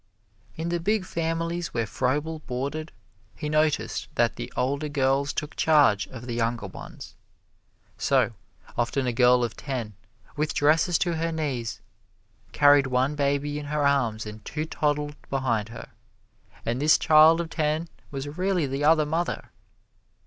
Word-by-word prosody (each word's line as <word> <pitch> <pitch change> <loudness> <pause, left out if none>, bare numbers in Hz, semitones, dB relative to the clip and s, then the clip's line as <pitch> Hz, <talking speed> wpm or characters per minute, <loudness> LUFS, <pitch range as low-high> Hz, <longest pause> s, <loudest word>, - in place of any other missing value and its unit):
In 165 +1 -3
the 175 0 0
big 205 +3 0
families 165 0 -2
where 115 -1 +1
Froebel 145 +8 -1
boarded, 140 +5 -3 0.4
he 150 - -4
noticed 155 0 0
that - - +2
the - - -6
older 140 +4 0
girls 140 0 +1
took 150 0 -5
charge 145 -10 +4
of 120 -2 -10
the 120 - -4
younger 115 -1 -1
ones. 95 - -10 0.9
So, - - +2 0.4
often 120 +3 0
a 125 - 0
girl 125 0 +5
of 115 -3 -3
ten, 125 -7 -4 0.4
with 150 +1 -1
dresses 160 +3 +3
to 170 -3 0
her 165 +1 -1
knees, 135 -8 -3 0.7
carried 145 -1 +5
one 130 +2 +1
baby 145 0 0
in 150 - -7
her 145 0 0
arms 120 -7 +1
and 105 0 -9
two 150 +7 -3
toddled 150 -1 -1
behind 120 -6 0
her, 115 - -9 0.8
and 120 +3 -1
this 155 +1 +5
child 160 +1 +6
of 165 -1 -4
ten 155 +1 0 0.2
was 135 0 -5
really 185 -4 +1
the 135 +1 -3
other 155 0 +5
mother. 165 +4 -2
145 Hz, 150 wpm, -26 LUFS, 125-155 Hz, 0.9 s, child